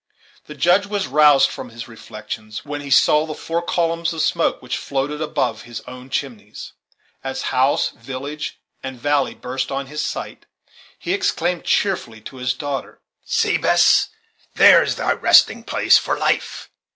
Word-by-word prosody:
The 150 - -9
Judge 175 +8 +3
was 200 -1 -2
roused 145 0 +5
from 125 - -8
his 115 0 -9
reflections, 110 -1 -8
when 145 0 -5
he 140 - -8
saw 150 +3 +4
the 155 - -5
four 165 +1 -3
columns 170 -1 -1
of 160 -1 -1
smoke 165 +2 +1
which 125 - -4
floated 145 +2 -3
above 155 - -1
his 120 -2 -8
own 125 +2 -11
chimneys. 115 -7 -6 0.5
As 135 0 -4
house, 130 +2 +2
village, 135 +5 -7 0.2
and 130 -2 -7
valley 145 +1 0
burst 130 +2 -4
on 135 0 -3
his 150 +2 -4
sight, - - -6 0.5
he 350 - -3
exclaimed 180 - -1
cheerfully 180 - 0
to 130 - -11
his 125 0 -1
daughter: 145 -2 -5 0.3
"See, - - +1
Bess, - - +4 0.5
there - - +8
is - - -1
thy - - 0
resting - - +4
place - - +4
for - - -2
life! - - -2
140 Hz, 160 wpm, -20 LUFS, 125-160 Hz, 0.5 s, there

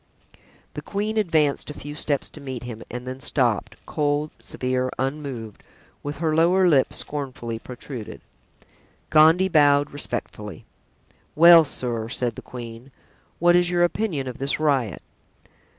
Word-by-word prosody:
The - - -6
queen 210 +2 -3
advanced 155 -9 +1
a 150 - -7
few 145 +1 -8
steps 145 -2 -1
to 150 - -12
meet 130 -4 -6
him, 115 -2 -7
and 125 +1 -6
then 130 +1 -6
stopped, 120 -5 +1
cold, 150 0 -1
severe, 130 0 -2
unmoved, 130 -5 -4 0.4
with 145 +1 -5
her 160 -2 0
lower 180 +3 +4
lip 140 -6 +4
scornfully 130 -6 -4
protruded. 125 -1 -8 0.9
Gondy 160 +4 +6
bowed 145 -4 +4
respectfully. 105 - -5 0.7
"Well, 170 +1 +9
sir," 120 -5 -3
said 125 -1 -1
the - - -9
queen, 120 +1 -9 0.5
"what 175 +1 +4
is 175 0 +3
your 175 -1 +2
opinion 175 -6 -1
of 125 - -7
this 135 +2 -1
riot?" 135 - 0
140 Hz, 135 wpm, -24 LUFS, 125-155 Hz, 0.9 s, Well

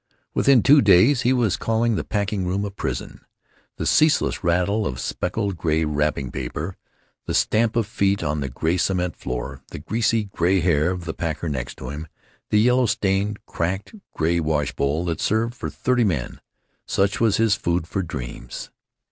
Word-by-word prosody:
Within 135 -5 +4
two 145 +1 +7
days 105 +7 +5
he 125 - +2
was 120 -7 +2
calling 115 +1 +1
the - - -2
packing 100 -3 -2
room 95 +3 -1
a 100 - -4
prison. 95 - -5 0.6
The - - -3
ceaseless 155 0 +3
rattle 90 +5 +1
of 65 - -5
speckled 100 +1 -2
gray 80 -1 +1
wrapping 75 -3 -1
paper, 75 +8 -4 0.5
the - - -1
stamp 110 +1 +2
of 115 -2 +2
feet 100 -1 0
on 75 +1 -1
the 70 -2 -3
gray 80 +7 -1
cement 90 0 0
floor, 65 +1 -5
the - - -7
greasy 110 +7 0
gray 95 -1 +1
hair 85 -2 +2
of 90 -2 -4
the 80 - -3
packer 80 0 -3
next 65 -4 -4
to - - -7
him, 75 +3 -6 0.4
the 105 - +3
yellow 125 +2 +4
stained, 100 +1 0
cracked, 95 - -3 0.2
gray 85 +2 +1
wash 75 -3 0
bowl 75 +5 0
that 85 -2 -2
served 115 +2 +1
for 120 - -5
thirty 125 -1 +1
men, 80 - -2 0.5
such 100 +2 +1
was 110 -4 +3
his 110 -2 +3
food 85 -4 0
for 95 - -2
dreams. 70 -8 -7
95 Hz, 175 wpm, -23 LUFS, 80-110 Hz, 0.6 s, two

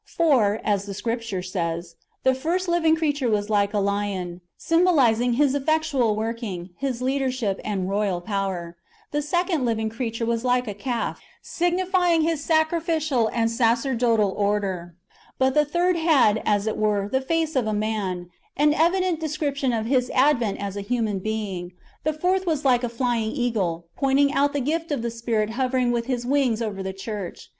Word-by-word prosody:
For, 245 -11 +3
[as 200 -2 0
the 200 - -5
Scripture] 230 -4 -3
says, 170 -2 -3
" - - -45
The 260 - +4
first 335 +8 -1
living 335 -2 +3
creature 290 -5 0
was 210 0 0
like 200 -1 +2
a 210 - -1
lion,"* 200 -3 -2 0.2
symbolizing 270 -9 +3
His 275 +2 +3
effectual 285 -5 +1
working, 215 -5 -4
His 255 -3 -3
leadership, 260 -6 -1
and 200 -3 -2
I'oyal 195 -3 -1
power; 190 -4 -3 0.3
the 295 - 0
second 345 0 0
[living 220 -2 0
creature] 230 0 -3
was 230 0 -1
like 250 -1 +1
a 210 - -3
calf, 235 +3 -3 0.2
signifying 355 -1 +1
[His] 320 -2 0
sacrificial 315 -6 +1
and 230 -1 +1
sacerdotal 230 -2 +2
order; 195 -4 -1 0.4
but 265 0 +2
"the 300 +1 +4
third 345 +4 +1
had, 280 -10 +4
as 205 -1 +2
it 220 - -2
were, 205 -2 +1
the 265 +5 0
face 325 +3 0
as 285 - -2
of 240 -4 +1
a - - 0
man," 200 -5 -2
— - - -34
an 295 +1 +4
evident 350 +1 +2
description 290 -4 -1
of 225 -2 -1
His 250 0 +1
advent 255 -6 +3
as 200 -1 -5
a 200 - -3
human 215 -2 -1
being; 195 -4 -4 0.3
"the 310 - +1
fourth 365 +4 0
was 310 -3 0
like 250 -2 +4
a 245 - 0
flying 235 -2 -1
eagle," 200 - -1
pointing 275 +1 +3
out 285 0 +2
the 285 - 0
gift 320 +4 -2
of 275 -5 -1
the 235 - -2
Spirit 225 -2 -1
hovering 255 0 +1
with 235 0 -1
His 245 -2 -2
wings 255 -4 +2
over 210 -4 -3
the 190 0 -3
church. 195 -1 -7
240 Hz, 180 wpm, -24 LUFS, 205-290 Hz, 0.4 s, The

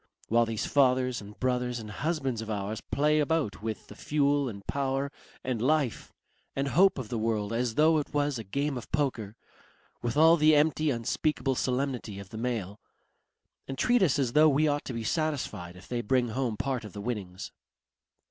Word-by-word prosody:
While 115 +1 +3
these 110 -2 -2
fathers 130 -3 +2
and 105 +1 -12
brothers 125 -1 0
and 110 -2 -7
husbands 135 -4 -2
of 110 - -7
ours 105 +1 -3
play 150 +2 +1
about 150 -8 0
with 110 0 -4
the - - -12
fuel 145 -2 +1
and 100 -3 -9
power 140 0 -1 0.3
and 125 -4 -2
life 140 -2 0 0.4
and 140 +1 0
hope 190 +6 +4
of 125 -5 -5
the 115 - -2
world 110 -1 -1
as 120 -1 -1
though 155 +1 +5
it 145 - -5
was 145 -3 0
a - - -5
game 140 +6 -2
of - - -13
poker. 125 -8 -1 0.7
With 120 +3 -2
all 165 +2 +7
the 155 0 +5
empty 155 +1 +3
unspeakable 135 +3 0
solemnity 125 -5 -2
of 100 -1 -9
the 110 - -7
male. 110 -5 -3 0.9
And 135 - -5
treat 245 - +3
us 150 -7 +3
as 130 -4 0
though 155 +1 +6
we 150 +2 +3
ought 145 0 0
to 130 - -5
be 115 -1 -4
satisfied 135 - -2
if 90 - -14
they 120 -1 -2
bring 120 +2 +1
home 120 -2 -2
part 130 -1 -2
of 105 - -9
the 100 - -6
winnings. 100 -5 -5
130 Hz, 190 wpm, -29 LUFS, 110-145 Hz, 0.9 s, all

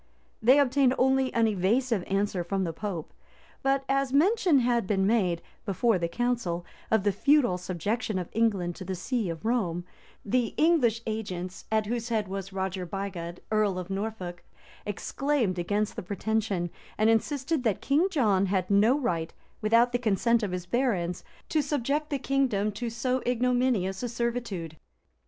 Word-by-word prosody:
[] - - -39
They 250 +5 +6
obtained 265 -1 +3
only 265 0 +3
an 230 -1 +4
evasive 215 +2 +1
answer 195 -2 0
from 190 +2 -1
the 165 -2 -2
pope; 180 -3 -5 0.5
but 270 0 +1
as 275 -1 +1
mention 355 - +4
had 235 -4 +1
been 195 -2 +1
made, 185 -6 +1 0.2
before 210 0 +1
the 170 - 0
council, 210 -5 -1 0.2
of 220 -3 +2
the 205 - +3
feudal 240 -2 +3
subjection 190 +4 -2
of 180 -2 -3
England 200 -6 +1
to - - -7
the 190 0 -4
see 220 +2 -2
of 165 +1 -6
Rome, 180 -8 0 0.4
the 235 +2 0
English 255 -9 +3
agents, 190 -5 -4
at 220 -1 +2
whose 235 +2 -3
head 220 -3 0
was 195 0 -5
Roger 190 -1 -3
Bigod, 180 -2 -5
earl 210 -3 +2
of 185 +1 -5
Norfolk, 195 -4 -4 0.4
exclaimed 225 -1 -1
against 205 +4 -1
the - - -4
pretension, 200 -2 -1 0.3
and 215 - +3
insisted 265 +5 +1
that 220 -6 +1
King 300 +7 +2
John 210 - +2
had 185 0 0
no 215 +7 +5
right, 170 - -1 0.3
without 230 +3 +4
the 245 - 0
consent 235 +1 +2
of 205 -4 -2
his 180 -1 -4
barons, 180 -5 0 0.3
to 310 - +2
subject 290 +1 -1
the 285 - 0
kingdom 255 -7 +1
to 235 +3 -4
so 250 +3 -1
ignominious 245 -6 +1
a 245 - -2
servitude. 230 -9 -3
220 Hz, 165 wpm, -28 LUFS, 185-250 Hz, 0.5 s, They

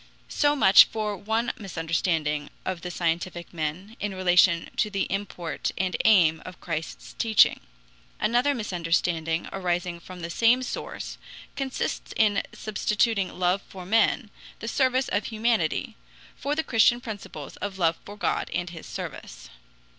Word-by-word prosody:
So 290 0 +2
much 195 -8 +8
for 215 -2 -3
one 220 +5 -1
misunderstanding 165 -5 -1 0.2
of 185 -2 -3
the 180 - -5
scientific 175 0 -2
men, 170 +7 -4
in 205 -2 -3
relation 180 -2 +4
to 215 - +2
the 195 -2 -1
import 190 -4 -3
and 185 -1 0
aim 170 -7 +5
of 185 0 -10
Christ's 165 -2 -5
teaching. 220 -2 +5 0.6
Another 250 +5 +2
misunderstanding 165 -5 -1
arising 175 -2 -2
from 180 +1 -10
the 170 0 -5
same 235 +6 +4
source - - -6 0.4
consists 270 -1 -3
in 210 -2 +3
substituting 210 -1 0
love 180 +2 +2
for 185 -2 -9
men, 225 +2 +2 0.3
the 225 - -7
service 260 +1 +2
of 205 - 0
humanity, 220 -7 0 0.4
for 285 +2 -2
the 320 - 0
Christian 240 -3 +4
principles 205 - -8
of 200 -2 -5
love 165 -3 +2
for 205 +1 -10
God - - -1
and 175 0 -2
his 165 - -9
service. - - -8
190 Hz, 140 wpm, -26 LUFS, 170-220 Hz, 0.6 s, much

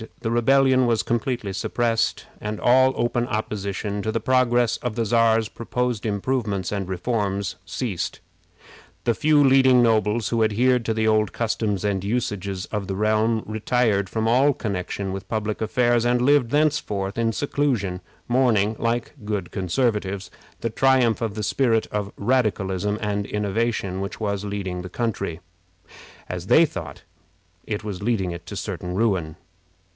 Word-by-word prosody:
The 115 - -2
rebellion 130 +2 +4
was 115 -2 +1
completely 120 -3 -2
suppressed, 115 +3 0
and 105 0 -4
all 130 +2 +5
open 120 0 0
opposition 105 -3 -3
to 110 - -2
the 115 - -1
progress 120 -2 +2
of 120 -3 -4
the 115 -1 0
Czar's 115 0 +3
proposed 120 0 -2
improvements 100 -3 -1
and 100 -3 -3
reforms 100 0 -1
ceased. 110 -5 -3 0.8
The 120 - +2
few 150 +3 +4
leading 130 -2 +5
nobles 110 -1 +2
who 115 -1 +2
adhered 120 +3 +2
to 110 - 0
the 110 0 +1
old 110 -1 +2
customs 105 -4 -1
and 100 -2 0
usages 100 -4 -2
of 105 -3 -3
the 95 - -3
realm 110 +2 +1
retired 110 -2 0
from 110 +1 -1
all 135 +5 +4
connection 100 -3 -3
with 95 -1 -7
public 110 -1 -2
affairs, 120 +1 +2
and 120 0 +2
lived 130 -1 +3
thenceforth 115 -9 0
in 115 -1 +2
seclusion, 115 -8 -1 0.3
mourning, 115 -4 +2
like 115 +1 -1
good 105 -4 -3
Conservatives, 100 0 -1 0.3
the 115 - -2
triumph 130 -3 +3
of 110 -3 -2
the 105 - -3
spirit 115 0 +2
of 105 -1 -2
radicalism 105 -4 0
and 100 -1 -1
innovation 105 -2 -1
which 100 - -5
was 100 -2 -2
leading 95 -3 -4
the 90 - -7
country, 105 -6 -3 0.9
as - - -5
they - - +6
thought, - - -7 0.7
to 100 -4 -3
certain 90 0 -4
ruin. 95 -8 0
110 Hz, 140 wpm, -23 LUFS, 100-120 Hz, 0.9 s, they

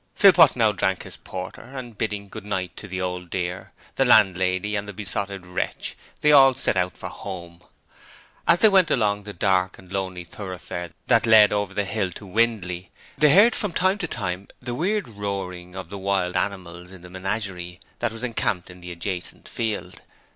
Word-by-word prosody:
Philpot 180 -6 +7
now 110 -3 +4
drank 95 -2 -1
his - - -8
porter, 95 0 -7
and 125 -2 -9
bidding 105 -1 -3
'good - - -9
night' 95 -4 -3
to 100 - -8
the 95 -1 -4
Old 90 -1 -3
Dear, 90 0 -4 0.3
the - - +4
landlady 95 +2 +3
and 100 0 -2
the - - -6
Besotted 100 -1 -4
Wretch, 90 - -3 0.3
they 150 - +5
all 135 -2 +7
set 125 - 0
out 90 -1 0
for - - -6
home. 85 -3 -8 0.9
As 170 +1 +5
they 220 - +8
went 190 -4 +5
along 105 -4 +1
the 105 - -6
dark 95 0 +1
and 95 0 -14
lonely 95 -2 -3
thoroughfare 90 -1 -7 0.2
that 115 -1 +3
led 110 -2 +7
over 100 -2 -1
the 105 - 0
hill 95 -2 -1
to 105 - -10
Windley, 95 -3 0 0.3
they 150 +1 +5
heard 210 +9 +7
from 205 -5 -2
time 190 +4 +2
to 175 - -2
time 95 - -3
the 120 -1 -5
weird 195 - 0
roaring 95 -4 -5
of 95 - -7
the 100 - -7
wild 95 -2 0
animals 90 -3 -3
in 95 -2 -13
the 90 - -11
menagerie 95 -2 -4 0.2
that 120 -1 0
was 115 +2 -8
encamped 100 -7 -1
in 90 0 -14
the 90 0 -8
adjacent 90 +1 -5
field. 105 -5 -3
100 Hz, 190 wpm, -24 LUFS, 90-115 Hz, 0.9 s, they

